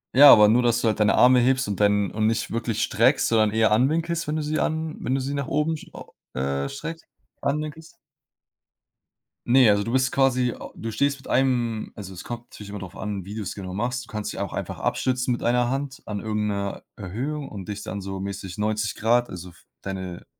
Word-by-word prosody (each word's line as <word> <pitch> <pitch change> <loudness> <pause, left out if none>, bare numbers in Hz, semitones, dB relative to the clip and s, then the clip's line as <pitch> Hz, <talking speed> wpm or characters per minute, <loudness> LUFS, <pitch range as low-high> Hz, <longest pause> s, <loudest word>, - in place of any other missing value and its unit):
Ja, 140 +2 +10
aber 105 -1 +7
nur, 125 +3 +4
dass 120 0 +2
du 115 - +1
halt 110 - 0
deine 105 - +4
Arme 125 0 +6
hebst 130 -1 +2
und 100 -2 -3
dein 105 -1 +3
und 110 0 -1
nicht 115 +1 0
wirklich 115 -1 -2
streckst, 125 +5 +3
sondern 110 -2 +3
eher 110 0 +3
anwinkelst, 160 +9 +1
wenn 150 +1 -1
du - - -1
sie 155 +1 -1
an 160 0 -2
wenn 130 - -1
du 135 - 0
sie 140 +2 -3
nach 140 - -2
oben 150 +2 0
sch - - -12
o - - -12 0.2
äh, 70 +1 -1
streckst 165 +4 -7 0.4
anwinkelst. 155 +4 -3 1.5
Ne, 125 -1 +6
also, 100 0 +3
du 115 - -4
bist 130 0 +2
quasi 130 -2 +2
a - - -9
du 115 - -5
stehst 140 +4 +1
mit 135 - -14
einem 120 -4 +1
also, 95 -2 -8
es 90 - -9
kommt 120 0 -6
natürlich 105 -1 -10
immer 105 0 -6
drauf 95 0 -9
an, 100 -2 -4
wie 100 +2 -7
du's 100 -3 -4
genau 95 -2 -6
machst. 120 +4 -2
Du - - -16
kannst 105 -1 -3
dich - - -7
auch - - -3
einfach - - -5
abstützen 125 -1 0
mit 120 - -2
1 120 0 +2
Hand 135 +1 -3
an 105 -1 -4
irgend 105 0 -2
'ner 100 -1 -3
Erhöhung 135 +9 -4
und 100 -3 -8
dich 105 0 -4
dann 100 -1 -5
so 95 0 -5
mäßig 95 -1 -6
90 105 0 -1
Grad, 120 +2 +2
also, 90 0 -8
f 85 - -20 0.2
deine 95 -3 -6
115 Hz, 225 wpm, -24 LUFS, 105-135 Hz, 1.5 s, Ja